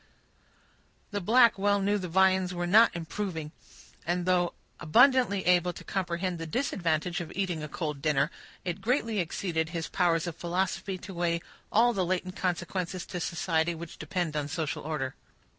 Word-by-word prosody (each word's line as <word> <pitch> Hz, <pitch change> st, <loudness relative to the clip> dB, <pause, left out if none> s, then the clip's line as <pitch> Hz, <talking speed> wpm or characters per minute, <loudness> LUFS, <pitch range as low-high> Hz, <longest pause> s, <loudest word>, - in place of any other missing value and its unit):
The 205 Hz, -1 st, -2 dB
black 230 Hz, +1 st, +5 dB
well 200 Hz, 0 st, +3 dB
knew 205 Hz, +1 st, +1 dB
the 185 Hz, -, -4 dB
viands 185 Hz, +1 st, +3 dB
were 175 Hz, 0 st, -1 dB
not 215 Hz, +5 st, +6 dB
improving; 165 Hz, -2 st, -4 dB, 0.5 s
and 175 Hz, +1 st, -1 dB
though 180 Hz, -1 st, +2 dB, 0.2 s
abundantly 245 Hz, -, +4 dB
able 180 Hz, 0 st, +3 dB
to -, -, -10 dB
comprehend 180 Hz, -1 st, -2 dB
the 165 Hz, -, -5 dB
disadvantage 175 Hz, -, -1 dB
of 165 Hz, -, -7 dB
eating 180 Hz, -4 st, -1 dB
a 155 Hz, -, -4 dB
cold 150 Hz, -2 st, -4 dB
dinner, 145 Hz, -2 st, +2 dB, 0.3 s
it 180 Hz, +1 st, -3 dB
greatly 230 Hz, -1 st, 0 dB
exceeded 165 Hz, -1 st, -1 dB
his 165 Hz, -1 st, -4 dB
powers 165 Hz, -2 st, +2 dB
of 170 Hz, -3 st, -4 dB
philosophy 185 Hz, +2 st, -2 dB
to 190 Hz, +1 st, -9 dB
weigh 170 Hz, -1 st, 0 dB, 0.3 s
all 240 Hz, +3 st, +4 dB
the 190 Hz, -4 st, 0 dB
latent 185 Hz, +1 st, -2 dB
consequences 180 Hz, 0 st, -2 dB
to 180 Hz, -, -5 dB
society 170 Hz, -1 st, 0 dB
which 165 Hz, 0 st, -9 dB
depend 160 Hz, 0 st, -2 dB
on 150 Hz, -1 st, -1 dB
social 155 Hz, 0 st, -3 dB
order. 135 Hz, -4 st, -3 dB
180 Hz, 160 wpm, -29 LUFS, 165-190 Hz, 0.5 s, not